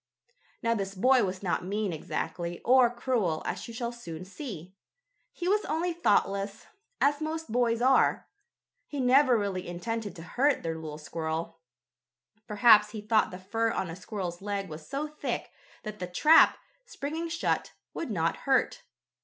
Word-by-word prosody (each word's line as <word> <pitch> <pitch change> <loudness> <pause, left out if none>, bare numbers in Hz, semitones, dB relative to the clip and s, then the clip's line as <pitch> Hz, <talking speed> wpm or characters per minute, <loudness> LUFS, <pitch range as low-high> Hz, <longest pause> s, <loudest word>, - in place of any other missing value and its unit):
Now 230 0 +2
this 195 -3 -3
boy 255 +6 +4
was 185 0 -3
not 180 - 0
mean 200 0 -2
exactly, 170 +2 -4
or 255 -1 +6
cruel, 235 -9 -1
as - - -4
you 230 - -8
shall 235 0 -3
soon 180 -8 -8
see. 185 - -8 0.6
He 350 - -5
was 415 +3 +2
only 340 +2 -1
thoughtless, 200 -9 0 0.3
as 290 +2 +2
most 320 -2 -4
boys 235 0 +1
are. 265 +1 +3 0.6
He 290 - -5
never 260 0 +5
really 195 -3 -2
intended 205 +3 -4
to 165 - -9
hurt 270 - +1
the 165 - -2
little 160 -2 -5
squirrel. 160 +2 -4 0.9
Perhaps 210 0 +6
he 215 - -5
thought 215 +1 +2
the 180 - -8
fur 225 +5 -1
on 185 -6 -2
a - - -6
squirrel's 185 -2 -5
leg 200 -1 -3
was 155 0 -9
so 280 +2 -2
thick 305 0 -4 0.3
that 215 -1 -7
the 180 - -4
trap, 305 - +6 0.3
springing 320 - -4
shut, 335 +1 -1 0.2
would 330 - -4
not 165 -6 0
hurt. 265 -2 +1
210 Hz, 160 wpm, -29 LUFS, 180-260 Hz, 0.9 s, or